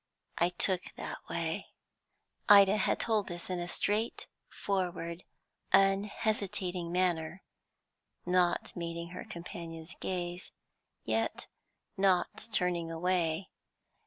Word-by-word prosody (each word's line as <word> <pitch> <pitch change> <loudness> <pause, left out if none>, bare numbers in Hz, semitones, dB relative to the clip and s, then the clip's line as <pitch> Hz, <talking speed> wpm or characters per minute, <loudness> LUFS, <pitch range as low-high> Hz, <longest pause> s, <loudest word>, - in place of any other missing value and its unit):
I 170 - +4
took 180 +1 -1
that - - -5
way." - - -2 0.8
Ida 200 0 +9
had 200 - +2
told 220 -3 +1
this 175 +1 -6
in 180 - -1
a 175 - -3
straightforward, 185 -4 -2 0.5
unhesitating 195 -2 +2
manner, 175 -1 0 0.8
not 180 -1 +2
meeting 170 0 -4
her 180 - -7
companion's 170 -1 -7
gaze, 175 -1 -3 0.5
yet - - -1 0.5
not 190 +3 +2
turning 175 -4 +1
away. 170 +1 0
180 Hz, 95 wpm, -32 LUFS, 170-195 Hz, 0.8 s, Ida